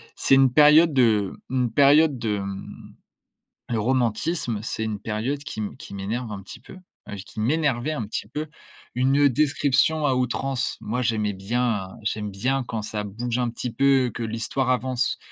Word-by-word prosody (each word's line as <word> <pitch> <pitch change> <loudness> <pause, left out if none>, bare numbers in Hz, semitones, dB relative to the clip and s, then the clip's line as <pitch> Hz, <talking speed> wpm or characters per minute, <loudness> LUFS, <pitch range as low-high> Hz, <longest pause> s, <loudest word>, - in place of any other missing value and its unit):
c'est 135 - +3
une 135 -2 +5
période 150 +2 +6
de 110 -7 +3 0.2
une 125 -3 0
période 145 0 +5
de, 105 -3 -2
mmh, 100 0 -8 0.7
le 115 -2 0
romantisme 120 +1 0
c'est 110 0 -3
une 105 -2 -3
période 115 +7 -3
qui 110 - -7
m 105 - -4
qui - - -11
m'énerve 110 +4 -4
un 100 -1 -6
petit 95 - -11
peu, - - -13 0.4
heu, 105 - -5
qui - - -10
m'énervait 140 +1 0
un 120 -9 -3
petit 105 - -4
peu, 150 +6 -5 0.5
une 135 +3 +4
description 145 +2 +2
à 130 -2 +2
outrance. 125 -1 -1
Moi 125 +4 -3
j'aimais 105 -3 0
bien, 105 0 -1
heu, - - -13
j'aime 105 -1 -2
bien 130 +7 -1
quand 110 -3 -3
ça 105 0 -4
bouge 115 +4 -3
un 120 -1 0
petit 120 +1 -5
peu, 135 -1 +3
que 120 - -4
l'histoire 115 +4 -2
avance. 125 -1 0
120 Hz, 175 wpm, -24 LUFS, 110-135 Hz, 0.7 s, période